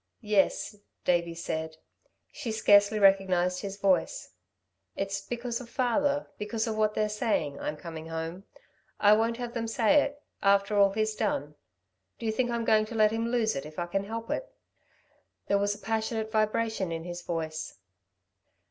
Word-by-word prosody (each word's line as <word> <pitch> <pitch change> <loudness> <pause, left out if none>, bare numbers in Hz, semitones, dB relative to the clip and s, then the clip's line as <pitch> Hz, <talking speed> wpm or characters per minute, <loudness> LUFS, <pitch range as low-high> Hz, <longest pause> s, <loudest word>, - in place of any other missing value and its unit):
"Yes," 210 0 +1 0.3
Davey 170 -1 +1
said. 160 -1 -4 0.5
She 230 - -5
scarcely 205 -1 +5
recognised 190 -3 +3
his 200 -1 -5
voice. 190 -4 +1 0.6
"It's 195 0 -2
because 240 +3 -4
of 240 - -11
father 280 +4 +1
because 215 +1 -2
of 220 -2 -2
what 215 -1 +1
they're 215 - +1
saying 210 -9 -1
I'm 150 - -3
coming 160 0 -8
home. 165 +4 -5 0.5
I 205 0 +6
won't 225 +2 +2
have 240 -1 -5
them 230 -1 -2
say 230 +6 +4
it... 285 0 -3 0.2
after 200 +1 +3
all 200 -1 +6
he's 215 +1 0
done... 150 -9 -1 0.6
do 230 - -7
you 220 - +1
think 245 +2 0
I'm 235 -1 -1
going 215 -1 +4
to 230 - -7
let 215 -1 +4
him 225 +1 -1
lose 235 -2 +1
it, 135 - -3
if 155 +1 -11
I 175 - -1
can 195 +3 -2
help 225 +2 -5
it." - - -3 0.9
There 200 - +2
was 205 0 +1
a - - -14
passionate 220 0 -2
vibration 215 -3 0
in 165 0 -4
his 175 0 -6
voice. 160 -2 -4
210 Hz, 170 wpm, -29 LUFS, 180-225 Hz, 0.9 s, I